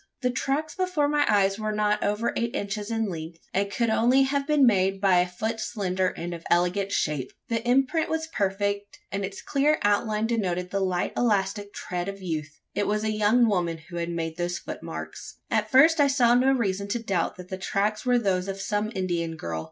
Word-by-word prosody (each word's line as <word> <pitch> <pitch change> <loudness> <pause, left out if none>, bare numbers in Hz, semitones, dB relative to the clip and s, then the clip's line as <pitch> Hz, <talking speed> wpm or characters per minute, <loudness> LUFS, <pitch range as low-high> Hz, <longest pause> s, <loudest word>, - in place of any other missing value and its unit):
The 250 - +2
tracks 275 +5 -1
before 365 -6 0
my 295 0 +2
eyes 200 -1 +3
were 215 0 -1
not 210 0 +1
over 210 +3 0
eight 235 0 -1
inches 205 +1 -3
in 225 -1 0
length: 165 -2 -6 0.2
and 200 +1 +1
could 230 +1 0
only 245 +5 +4
have 275 +1 -1
been 300 -3 +5
made 195 -4 +3
by 190 -2 +4
a 180 - +2
foot 220 +6 -3
slender, 190 -4 -1
and 175 -1 -4
of 170 -1 -8
elegant 180 +3 +2
shape. 150 -8 -1 0.2
The 230 -1 0
imprint 270 +5 +2
was 320 0 -1
perfect; 200 -5 -2
and 195 0 -2
its 195 +2 -6
clear 295 +2 +2
outline 210 +1 +2
denoted 180 -6 -1
the 200 - 0
light 185 -2 -1
elastic 205 -3 0
tread 180 -2 -4
of 200 0 -7
youth. 155 -5 -5
It 205 - 0
was 210 +1 0
a 215 - 0
young 215 +3 +3
woman 175 -5 0
who 170 +2 -10
had 170 0 -2
made 165 -1 -3
those 175 0 -1
footmarks. - - -7 0.2
At - - +1
first, 310 +5 +6
I 285 - +6
saw 250 -4 +4
no 255 +2 +4
reason 200 -6 0
to 235 +4 -1
doubt 190 -6 -1
that 180 0 -11
the 190 - -4
tracks 205 +2 -1
were 250 -1 +3
those 190 -5 0
of 195 0 -4
some 210 +2 -1
Indian 170 -3 -1
girl. 85 - -4
205 Hz, 205 wpm, -26 LUFS, 185-235 Hz, 0.2 s, first